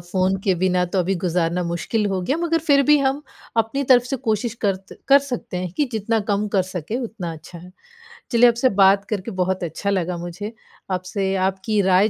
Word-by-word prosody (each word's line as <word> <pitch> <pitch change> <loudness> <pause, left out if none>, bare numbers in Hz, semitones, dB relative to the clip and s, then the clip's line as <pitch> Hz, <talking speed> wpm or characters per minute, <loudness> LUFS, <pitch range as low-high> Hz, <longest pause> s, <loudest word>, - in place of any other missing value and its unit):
Phone 185 +2 0
के 190 -2 +3
बिना 180 0 +1
तो 180 +2 -2
अभी 185 +2 +1
गुज़ारना 175 0 0
मुश्किल 170 +6 -1
हो 190 -2 -1
गया 275 - 0
मगर 330 -1 +1
फिर 280 -2 +5
भी 295 - +7
हम 275 +2 0 0.3
अपनी 225 +5 +1
तरफ़ 245 -1 +5
से 265 +2 -2
कोशिश 220 +1 0
करत 195 -1 -2
कर 280 +1 +8
सकते 245 -7 -4
हैं 180 -1 -3
कि 295 - +2
जितना 220 +1 0
कम 205 +1 +1
कर 190 - +4
सकें 180 +6 -4
उतना 215 -9 -5
अच्छा 160 +2 -11
है। 180 +2 -13 0.6
चलिए 240 +1 +6
आपसे 235 +2 +2
बात 195 +1 +5
करके 210 +1 -3
बहुत 185 0 -1
अच्छा 175 +4 -3
लगा 180 -3 -1
मुझे, 175 +6 -6 0.4
आपसे 190 +1 -2
आपकी 195 +2 -1
राय 195 +4 +5
195 Hz, 200 wpm, -22 LUFS, 180-230 Hz, 0.6 s, कर